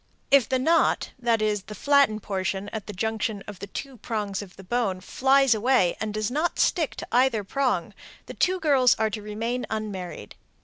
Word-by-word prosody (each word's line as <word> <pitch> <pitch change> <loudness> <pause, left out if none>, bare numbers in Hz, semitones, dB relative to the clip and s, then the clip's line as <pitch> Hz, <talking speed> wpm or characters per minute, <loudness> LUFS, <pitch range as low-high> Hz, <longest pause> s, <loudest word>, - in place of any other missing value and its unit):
If 275 -5 +5
the 260 - +2
"knot" 320 +6 +2
(that 230 -3 +1
is, 210 -1 0
the 210 +2 -10
flattened 280 -4 +3
portion 195 0 -2
at 215 -2 -6
the - - -4
junction 220 0 -2
of 205 -3 -8
the 200 - -7
two 265 +6 -7
prongs 210 -3 -3
of 195 -3 -11
the 195 - -12
bone) 200 -2 -1
flies 270 +4 +3
away 220 -5 +2
and 220 -1 -2
does 215 +1 -2
not 320 +5 -1
stick 325 -6 +1
to - - -7
either 245 -3 +3
prong, 265 +5 -1 0.3
the - - -8
two 370 0 +1
girls 275 -7 +4
are 220 0 0
to 215 - -5
remain 225 +4 -3
unmarried. 195 - -5
220 Hz, 190 wpm, -25 LUFS, 205-260 Hz, 0.3 s, If